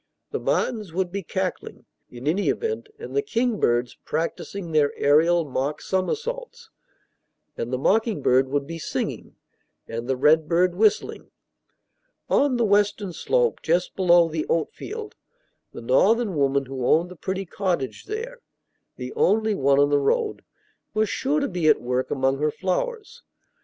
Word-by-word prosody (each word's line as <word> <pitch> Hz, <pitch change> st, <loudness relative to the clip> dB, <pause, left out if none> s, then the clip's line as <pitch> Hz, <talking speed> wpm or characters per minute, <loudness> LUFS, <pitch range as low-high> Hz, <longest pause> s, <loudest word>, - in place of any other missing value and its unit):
The -, -, -2 dB
martins 215 Hz, -8 st, -1 dB
would 185 Hz, -1 st, -1 dB
be 200 Hz, +1 st, -3 dB
cackling, 190 Hz, +1 st, -4 dB, 0.2 s
in 125 Hz, +2 st, -10 dB
any 190 Hz, +6 st, +1 dB
event, 450 Hz, -1 st, -2 dB
and 465 Hz, -, -8 dB
the 425 Hz, -, +3 dB
kingbirds 220 Hz, -, 0 dB
practicing 170 Hz, +3 st, -4 dB
their 150 Hz, -2 st, +3 dB
aerial 165 Hz, +4 st, +4 dB
mock 140 Hz, +1 st, -2 dB
somersaults; 465 Hz, -, -3 dB, 0.8 s
and 120 Hz, -, -4 dB
the 130 Hz, -, 0 dB
mocking 210 Hz, -, +1 dB
bird 130 Hz, +1 st, +3 dB
would 140 Hz, 0 st, -1 dB
be 165 Hz, +2 st, -7 dB
singing, -, -, -4 dB, 0.5 s
and 115 Hz, +1 st, -5 dB
the 130 Hz, -, +1 dB
redbird 160 Hz, +5 st, +3 dB
whistling. 210 Hz, +3 st, +1 dB, 1.0 s
On 275 Hz, -3 st, +3 dB
the 235 Hz, -, +2 dB
western 205 Hz, -2 st, +1 dB
slope, 485 Hz, -, 0 dB
just 175 Hz, +3 st, 0 dB
below 175 Hz, -2 st, +5 dB
the 160 Hz, -1 st, -3 dB
oatfield, 420 Hz, -, -3 dB, 0.6 s
the -, -, -9 dB
Northern 235 Hz, -, +3 dB
woman 140 Hz, -1 st, +1 dB
who 130 Hz, -1 st, -5 dB
owned 165 Hz, +7 st, +2 dB
the -, -, -9 dB
pretty 190 Hz, +4 st, -4 dB
cottage 175 Hz, -7 st, -2 dB
there 460 Hz, +4 st, -5 dB, 0.6 s
(the -, -, -7 dB
only 220 Hz, -, +2 dB
one 140 Hz, -6 st, +2 dB
on 145 Hz, 0 st, +4 dB
the 145 Hz, -, +4 dB
road) 435 Hz, -, 0 dB, 0.5 s
was 215 Hz, 0 st, +2 dB
sure 285 Hz, +3 st, 0 dB
to 280 Hz, -, 0 dB
be 175 Hz, -4 st, -1 dB
at -, -, +5 dB
work 125 Hz, +1 st, -2 dB
among 135 Hz, 0 st, 0 dB
her 150 Hz, +1 st, +2 dB
flowers. 460 Hz, -, -3 dB
180 Hz, 150 wpm, -24 LUFS, 145-230 Hz, 1.0 s, below